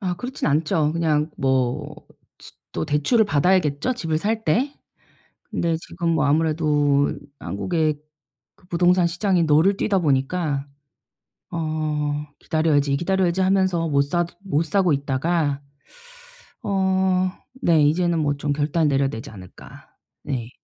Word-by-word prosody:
아 185 Hz, -3 st, -1 dB
그렇진 255 Hz, +6 st, -4 dB
않죠. 155 Hz, +1 st, +1 dB
그냥 155 Hz, -2 st, 0 dB
뭐 130 Hz, -2 st, 0 dB, 0.4 s
춧 -, -, -14 dB, 0.2 s
또 -, -, -3 dB
대출을 155 Hz, -, +2 dB
받아야겠죠 180 Hz, -, +1 dB
집을 160 Hz, -8 st, -2 dB
살 220 Hz, +5 st, -2 dB
때. 260 Hz, -, +1 dB, 0.8 s
근데 165 Hz, -1 st, 0 dB
지금 170 Hz, -1 st, -2 dB
뭐 160 Hz, -2 st, +2 dB
아무래도 150 Hz, -2 st, +2 dB, 0.3 s
한국의 155 Hz, -, -1 dB, 0.6 s
그 -, -, -25 dB
부동산 175 Hz, 0 st, +3 dB
시장이 180 Hz, 0 st, +1 dB
널을 160 Hz, +6 st, +4 dB
뛰다 200 Hz, -2 st, +1 dB
보니까 145 Hz, 0 st, 0 dB, 0.8 s
어 150 Hz, -2 st, -2 dB
'기다려야지, 145 Hz, -3 st, +1 dB
기다려야지.' 185 Hz, +2 st, 0 dB
하면서 185 Hz, -3 st, +2 dB
못 140 Hz, -2 st, +3 dB
사도 175 Hz, +4 st, -2 dB
못 160 Hz, -4 st, 0 dB
사고 175 Hz, 0 st, +2 dB
있다가 145 Hz, +1 st, 0 dB, 1.0 s
어 190 Hz, -2 st, +1 dB, 0.3 s
네 165 Hz, -, +4 dB
이제는 170 Hz, +3 st, +2 dB
뭐 145 Hz, -2 st, 0 dB
좀 145 Hz, 0 st, -1 dB
결단을 150 Hz, +2 st, +1 dB
내려야 135 Hz, -1 st, +1 dB
되지 115 Hz, +3 st, -7 dB
않을까. 95 Hz, -4 st, -13 dB, 0.3 s
네. 125 Hz, -5 st, -4 dB
160 Hz, 265 characters per minute, -22 LUFS, 145-180 Hz, 1.0 s, 널을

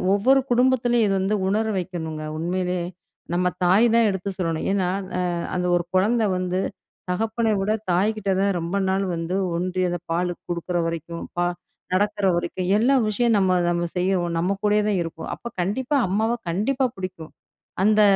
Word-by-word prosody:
ஒவ்வொரு 265 Hz, +7 st, +4 dB
குடும்பத்திலயும் 245 Hz, -2 st, +3 dB
இது 195 Hz, -, +1 dB
வந்து 200 Hz, +3 st, +1 dB
உணர 215 Hz, +3 st, +1 dB
வைக்கணுங்க, 160 Hz, -4 st, -5 dB, 0.2 s
உண்மையிலே. 180 Hz, +1 st, -1 dB, 0.5 s
நம்ம 180 Hz, +1 st, +2 dB, 0.2 s
தாய் 190 Hz, +6 st, +5 dB
தான் 235 Hz, -, +5 dB
எடுத்து 190 Hz, 0 st, -3 dB
சொல்லணும். 165 Hz, -3 st, -1 dB
ஏன்னா 190 Hz, -3 st, +1 dB, 0.3 s
அ -, -, +1 dB, 0.3 s
அந்த 180 Hz, 0 st, 0 dB
ஒரு 175 Hz, -, +1 dB
கொழந்த 220 Hz, +5 st, +3 dB
வந்து 185 Hz, 0 st, -1 dB, 0.5 s
தகப்பன 225 Hz, +4 st, 0 dB
விட 200 Hz, +2 st, 0 dB, 0.2 s
தாய்க்கிட்ட 200 Hz, +3 st, +1 dB
தான் 200 Hz, 0 st, +2 dB
ரொம்ப 170 Hz, +3 st, -2 dB
நாள் 190 Hz, +1 st, +1 dB
வந்து 165 Hz, +2 st, -3 dB, 0.2 s
ஒன்றி, 185 Hz, +1 st, -1 dB
அந்த 175 Hz, 0 st, -2 dB
பாலு 175 Hz, +1 st, 0 dB, 0.2 s
குடுக்குற 175 Hz, +1 st, -2 dB
வரைக்கும், 165 Hz, 0 st, -4 dB, 0.2 s
பா 175 Hz, -, +2 dB, 0.5 s
நடக்கிற 205 Hz, +1 st, +1 dB
வரைக்கும், 180 Hz, +1 st, -2 dB
எல்லா 255 Hz, +6 st, +3 dB
விஷயம் 230 Hz, +2 st, +2 dB
நம்ம 190 Hz, -2 st, +3 dB, 0.2 s
நம்ம 175 Hz, 0 st, 0 dB
செய்றோம். 180 Hz, -2 st, +1 dB
நம்ம 180 Hz, +4 st, +1 dB
கூடயே 210 Hz, 0 st, +3 dB
தான் 205 Hz, -, +1 dB
இருப்போம். 165 Hz, -1 st, -7 dB
அப்ப 235 Hz, -, -8 dB
கண்டிப்பா, 255 Hz, +10 st, 0 dB
அம்மாவ 220 Hz, +5 st, +1 dB, 0.2 s
கண்டிப்பா 250 Hz, +10 st, +1 dB
புடிக்கும். 185 Hz, -4 st, -7 dB, 0.5 s
அந்த 215 Hz, +1 st, +5 dB
190 Hz, 160 wpm, -23 LUFS, 175-215 Hz, 0.5 s, தாய்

